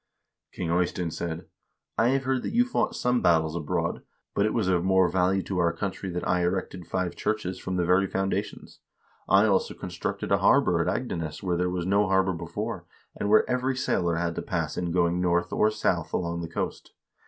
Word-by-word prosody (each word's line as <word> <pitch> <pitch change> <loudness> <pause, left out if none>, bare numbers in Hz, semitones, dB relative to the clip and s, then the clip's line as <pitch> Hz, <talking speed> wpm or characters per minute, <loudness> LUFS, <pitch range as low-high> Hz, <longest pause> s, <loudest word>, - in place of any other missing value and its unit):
King 85 -2 -3
Ey 90 +1 +3
stein 90 -1 -4
said: 85 0 -4 0.3
' - - -54
I 115 - +4
have 135 +1 +2
heard 130 -1 0
that - - -4
you 245 +1 +5
fought 250 - -1
some 125 0 +1
battles 80 -2 +3
abroad, 80 -4 -2 0.3
but 100 +1 +2
it - - -1
was 110 -5 +1
of 90 -2 +2
more 95 -1 +4
value 95 +2 +1
to 95 -2 -3
our 85 -1 +3
country 95 +2 -4
that 90 0 -3
I 90 0 +2
erected 90 -1 -2
five 90 0 -2
churches 100 -4 -2
from 95 - -4
the 90 -1 +1
very 90 +2 +3
foun 95 +1 -1
dations. - - -5 0.5
I 100 +2 +6
also 100 -3 +1
constructed - - -4
a - - +4
harbor - - +4
at - - -1
Agdenes 80 -1 -3
where 90 -2 0
there 90 +1 0
was 90 -1 -2
no 100 +2 +3
harbor 95 0 +2
before, 85 0 -5 0.3
and 100 - -2
where 110 - +5
every 130 +1 0
sailor 85 -8 0
had 85 0 -1
to - - -1
pass - - -2
in 90 -1 -2
going 85 0 +2
north 90 0 +1
or 110 - +3
south 90 -6 -1
along 85 -1 -1
the 85 - -5
coast. - - -4
90 Hz, 210 wpm, -27 LUFS, 85-95 Hz, 0.5 s, I